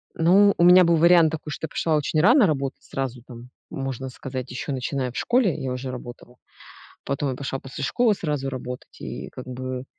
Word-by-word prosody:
Ну, 195 +5 +5
у - - +3
меня 180 +1 +8
был 170 0 +3
вариант 170 -1 +5
такой, 155 -1 -6
что 160 - -4
я 160 - -8
пошла 160 -2 0
очень 150 +1 0
рано 235 - +6
работать, 140 -4 -2
сразу 130 -3 -4
там, 120 0 -12 0.2
можно 135 -1 -5
сказать, 130 0 -7
еще 125 +3 -5
начиная 130 0 -2
в - - -9
школе, 240 - +2
я 130 -1 -3
уже 125 +1 -4
работала. 120 0 -10 0.7
Потом 140 +1 -2
я 130 - -4
пошла 135 0 -4
после 135 +1 -8
школы 230 - +2
сразу 150 -7 -3
работать 125 -1 -8
и - - -6
как 125 - -10
бы. 130 0 -5
135 Hz, 200 wpm, -24 LUFS, 130-165 Hz, 0.7 s, меня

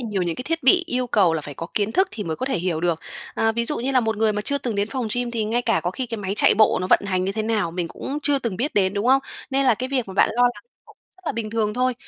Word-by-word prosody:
nhiều 195 -3 0
những 170 -2 -2
cái - - -5
thiết 330 0 -2
bị 355 +7 +5
yêu 250 0 -1
cầu 185 -8 +3
là 160 - -1
phải 145 -1 -8
có 165 - -6
kiến 210 +1 0
thức 380 0 +3
thì 210 - -6
mới 160 -1 -3
có 260 - -3
thể 265 - 0
hiểu 170 -2 -1
được. 170 -2 0 0.3
À, 225 0 +2
ví 235 +1 -1
dụ 300 - -3
như 260 +3 -1
là 260 - +4
một 220 -2 -1
người 220 0 +2
mà 210 - -2
chưa 280 +5 0
từng 240 -5 -3
đến 200 +1 0
phòng 255 -5 -2
gym, 245 -1 -1
thì 225 -2 -1
ngay 235 +3 0
cả 230 - +1
có 175 - -1
khi 255 +6 -4
cái 225 -1 -5
máy 195 0 -3
chạy - - +4
bộ 215 -2 +4
nó 185 - -1
vận - - +6
hành 185 -1 0
như 195 - -1
thế 220 +1 -2
nào 215 -6 0
mình 175 -1 -3
cũng 285 - -5
chưa 285 -1 +2
từng 230 -8 -3
biết 275 +8 -2
đến, 195 -1 +2
đúng 205 +3 -1
không? 270 +1 +5 0.3
Nên 275 0 +2
là 245 - +5
cái 255 +4 -4
việc 255 -6 -1
mà 190 - -7
bạn - - +4
lo 245 +2 +2
lắng 245 0 +1 0.2
cũng - - -19 0.2
rất 370 - -23
là - - 0
bình 220 -2 -4
thường 215 -1 0
thôi. 255 0 +1
225 Hz, 340 wpm, -23 LUFS, 195-255 Hz, 0.3 s, vận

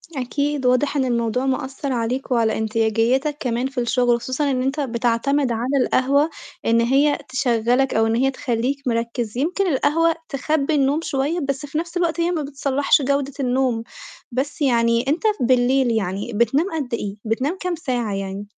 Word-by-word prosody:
أكيد. 280 +2 -2
واضح 280 +4 +2
إن 265 - +2
الموضوع 240 +1 0
مأثّر 265 +1 -2
عليك 250 +3 -2
وعلى 230 -2 +2
انتاجيّتك 225 +6 +1
كمان 245 +1 -1
في 265 -2 -5
الشُغل، 245 0 +2
وخصوصًا 265 +4 -1
إن 255 -1 0
أنت 270 +3 -1
بتعتمد 245 +1 0
على 250 +5 0
القهوة 280 +4 +2 0.4
إن 230 0 +3
هي 275 +5 +3
تشغَّلك 250 0 +1
أو 225 0 +3
إن 225 - +1
هي 270 +3 +2
تخلّيك 255 +1 -1
مركِّز، 235 -1 -2
يمكن 360 +7 0
القهوة 330 +3 +2
تخبّي 300 +2 0
النوم 280 +2 +2
شوية، 290 +4 -1
بس 275 +1 -2
في 290 +2 -5
نَفْس 340 +1 -3
الوقت 340 -1 0
هي 345 +1 +1
ما 325 -3 -1
بتصلَّحش 280 0 +1
جودة 280 0 0
النوم. 250 -3 0 0.5
بس 275 +5 -3
يعني 235 -1 +2
أنت 310 +7 0 0.2
بالليل 250 0 +3
يعني 200 +1 -2
بتنام 235 - +2
قد 270 -6 -4
إيه، 205 -3 -3
بتنام 265 +11 -1
كام 360 -1 -2
ساعة 245 -9 -2
يعني؟ 195 +1 -5
260 Hz, 165 wpm, -21 LUFS, 235-285 Hz, 0.5 s, إن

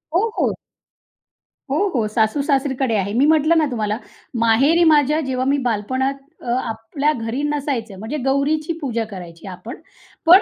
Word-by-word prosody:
हो, 405 +6 +3
हो. - - +1 1.1
हो, 345 +10 +2
हो. 225 -3 +1
सासू-सासरीकडे 265 +2 +1
आहे. 200 +1 -1
मी 255 +5 +4
म्हटलं 315 +2 +4
ना 315 - +4
तुम्हाला 215 -2 -1 0.4
माहेरी 270 +10 +4
माझ्या 300 0 +4
जेव्हा 260 -2 -1
मी 280 +1 +2
बालपणात 260 +5 0 0.3
अ, - - -12 0.2
आपल्या 230 +6 -1
घरी 230 +1 -3
नसायचं 275 -9 -2
म्हणजे 225 +8 -4
गौरीची 300 +4 +1
पूजा 235 -5 -1
करायची 175 -1 -9
आपण. 185 +7 -8 0.5
पण 355 +4 +9
265 Hz, 145 wpm, -20 LUFS, 225-295 Hz, 1.1 s, पण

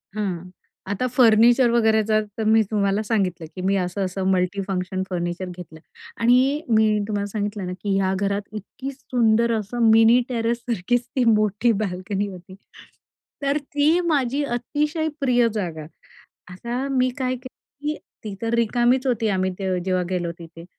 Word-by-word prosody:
हं. 185 -4 -3 0.4
आता 250 +6 -1
फर्निचर 240 0 +5
वगैरेचा 220 -2 +3 0.2
तर 220 - -1
मी 220 +1 +4
तुम्हाला 200 -1 +1
सांगितलं, 190 -6 -1
की 185 - -5
मी 195 +1 +1
असं, 185 +1 -2
असं 185 +1 -4
मल्टीफंक्शन 185 0 -1
फर्निचर 175 0 -3
घेतलं 160 -3 -10 0.4
आणि 255 +5 +3
मी 220 -1 +4 0.2
तुम्हाला 205 -2 -2
सांगितलं 205 -1 -3
ना, 180 - -4
की 195 +1 -2
या 190 -1 +1
घरात 200 +1 0
इतकी 240 +6 -7
सुंदर 235 -3 +1
असं 225 +2 +1
मिनी 225 +2 +6
टेरेस 235 -1 0
सारखीच 240 +1 -1
ती 255 - +2
मोठी 215 +1 +3
बाल्कनी 190 +1 -3
होती. 185 -1 -11 0.9
तर 280 +1 +1
ती 295 +3 +1
माझी 285 -2 +1
अतिशय 295 +6 -1
प्रिय 245 -4 +3
जागा. 170 -7 -4 0.7
आता 240 +8 -4
मी 255 0 +3
काय 255 -1 0
केलं, 255 +1 -11 0.3
की 305 - -1 0.3
ती 210 - -5
तर 230 +1 -1
रिकामीच 240 +3 +2
होती, 230 -3 +1
आम्ही 190 -2 0
त 185 -1 -1
जेव्हा 185 -1 0
गेलो 175 -2 -2
तिथे, 165 0 -11
215 Hz, 155 wpm, -23 LUFS, 190-245 Hz, 0.9 s, मिनी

